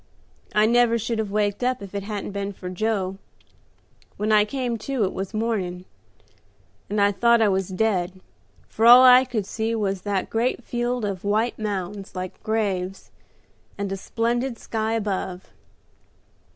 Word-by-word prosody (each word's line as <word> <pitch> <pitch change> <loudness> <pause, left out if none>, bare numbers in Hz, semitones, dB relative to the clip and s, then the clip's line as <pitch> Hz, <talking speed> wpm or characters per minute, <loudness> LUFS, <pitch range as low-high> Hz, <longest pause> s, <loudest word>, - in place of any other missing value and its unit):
I 210 0 +5
never 235 0 +4
should 230 0 -2
have 215 -2 -2
waked 205 +2 0
up 255 0 +1
if 195 - -10
it 200 - -2
hadn't 205 0 -5
been 200 0 -4
for 180 -1 -7
Joe. 195 -1 -1 1.0
When 215 +1 -1
I 210 -1 +5
came 245 0 -3
to, 260 +1 -1
it 190 - -1
was 190 0 -4
morning, 205 -5 -2 1.0
and 210 - -1
I 200 0 +4
thought 235 +3 +4
I 220 -2 +4
was 190 -1 0
dead, 185 -2 -1 0.5
for 225 +1 +1
all 245 +2 +10
I 255 0 +8
could 230 -6 -3
see 225 +3 -2
was 195 -3 -1
that 200 -1 -2
great 240 +2 0
field 240 -1 -2
of 195 -3 -4
white 215 +4 0
mounds, 200 -2 -4
like 185 0 -6
graves, 195 -4 -2 0.7
and 200 -1 -3
a - - -1
splendid 235 +5 -2
sky 220 0 -2
above. 190 -4 -3
210 Hz, 160 wpm, -24 LUFS, 195-230 Hz, 1.0 s, all